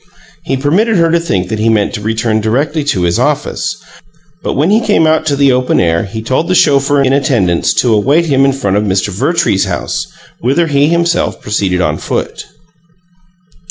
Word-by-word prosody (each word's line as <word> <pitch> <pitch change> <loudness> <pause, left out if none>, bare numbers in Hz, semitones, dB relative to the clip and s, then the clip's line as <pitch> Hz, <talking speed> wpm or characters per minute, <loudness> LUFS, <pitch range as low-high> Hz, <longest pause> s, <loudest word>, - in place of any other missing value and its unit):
He 135 - -1
permitted 185 - +1
her 165 -1 +2
to 170 - +2
think 95 - -2
that 110 - -3
he 110 +1 +1
meant 110 0 +1
to 105 - -5
return 110 0 -1
directly 145 +8 -1
to 95 -11 0
his 85 0 0
office, - - -2 0.6
but - - -3
when 155 +8 +1
he 220 +2 +3
came 210 -7 +2
out 155 0 +1
to 145 - +1
the 140 -1 +3
open 125 0 +1
air 85 -1 +1
he 110 +3 -7
told 130 +7 -1
the 185 - +1
chauffeur 140 -2 +3
in 135 0 +1
attendance 120 -11 +1
to 120 -3 +2
await 140 +11 +2
him 135 -4 +2
in 135 - +3
front 100 -7 -1
of 105 - +1
Mr. 95 0 -1
Vertrees's 95 - 0
house, - - -3 0.3
whither 140 +8 +1
he 145 -2 +2
himself 170 +1 0
proceeded 95 -3 -1
on 75 -3 -1
foot. - - -4
135 Hz, 195 wpm, -12 LUFS, 105-155 Hz, 0.6 s, he